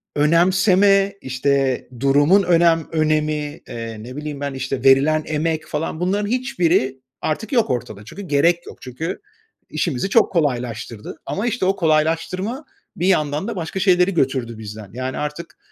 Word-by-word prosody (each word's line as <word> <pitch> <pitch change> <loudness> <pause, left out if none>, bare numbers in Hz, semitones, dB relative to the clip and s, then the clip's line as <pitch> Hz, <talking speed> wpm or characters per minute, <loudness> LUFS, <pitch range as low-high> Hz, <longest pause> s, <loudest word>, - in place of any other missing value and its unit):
önemseme, 190 +5 +4
işte, 130 0 0
durumun 145 +9 +4
önem 170 -2 +3
önemi, 155 -1 0
eee, 115 -2 -6
ne 125 +2 -9
bileyim 150 -1 -5
ben, 140 -1 -3
işte, 135 -1 -4
verilen 140 +4 +4
emek 155 0 -1
falan 155 +1 -3
bunların 200 +3 0
hiçbiri 175 - +1 0.2
artık 180 +8 -3
yok 235 -3 +3
ortada. 110 -4 -4
Çünkü 200 - -9
gerek 170 +2 +2
yok, - - -10
çünkü 145 +8 -5 0.5
işimizi 165 +2 -1
çok 225 +2 +4
kolaylaştırdı 120 - -2
ama, 200 +12 -2
işte, 235 -4 -1
o 190 +1 +2
kolaylaştırma 170 - 0 0.3
bir 175 - 0
yandan 155 -1 +1
da 235 - -4
başka 175 +2 -4
şeyleri 185 0 +3
götürdü 130 -6 0
bizden. 105 -1 -8
Yani 130 +1 -4
artık 150 +3 -5
155 Hz, 145 wpm, -21 LUFS, 135-180 Hz, 0.5 s, önemseme